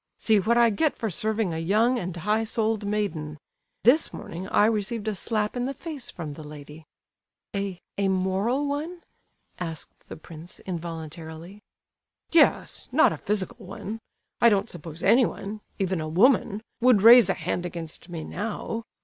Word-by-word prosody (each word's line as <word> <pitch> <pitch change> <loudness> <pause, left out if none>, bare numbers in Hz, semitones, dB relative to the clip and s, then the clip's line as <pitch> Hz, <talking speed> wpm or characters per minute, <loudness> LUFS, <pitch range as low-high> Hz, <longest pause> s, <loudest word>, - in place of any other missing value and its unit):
See 220 -2 +3
what 230 +5 +2
I 235 -1 +5
get 295 +9 +1
for 220 -3 -2
serving 215 -2 -1
a 160 - -3
young 220 +9 +2
and 180 -2 -5
high 210 +6 +1
souled 220 -1 -1
maiden! 160 -8 -2 0.5
This 260 +8 +4
morning 180 +3 -7
I 205 - +4
received 220 0 -1
a 215 - +1
slap 210 +3 -2
in 245 0 -1
the 275 - -4
face 300 -3 -6
from 160 -5 -6
the 155 - -10
lady!" 150 +1 -11 0.7
"A—a 200 0 -3
moral 190 +8 +1
one?" 310 +5 -4 0.6
asked 165 -3 -7
the - - -8
prince, 165 +1 -9
involuntarily. 165 +1 -7 0.7
"Yes—not 335 - +3
a - - -4
physical 205 -2 -3
one! 200 +3 -6 0.4
I 235 - +8
don't 200 -2 +1
suppose 165 -1 -9
anyone—even 200 -4 +1
a 155 - -4
woman—would 220 - +3
raise 235 -3 +9
a 190 - +2
hand 175 +1 -2
against 170 0 -8
me 165 -2 -5
now. 225 +4 -4
200 Hz, 150 wpm, -26 LUFS, 170-225 Hz, 0.7 s, raise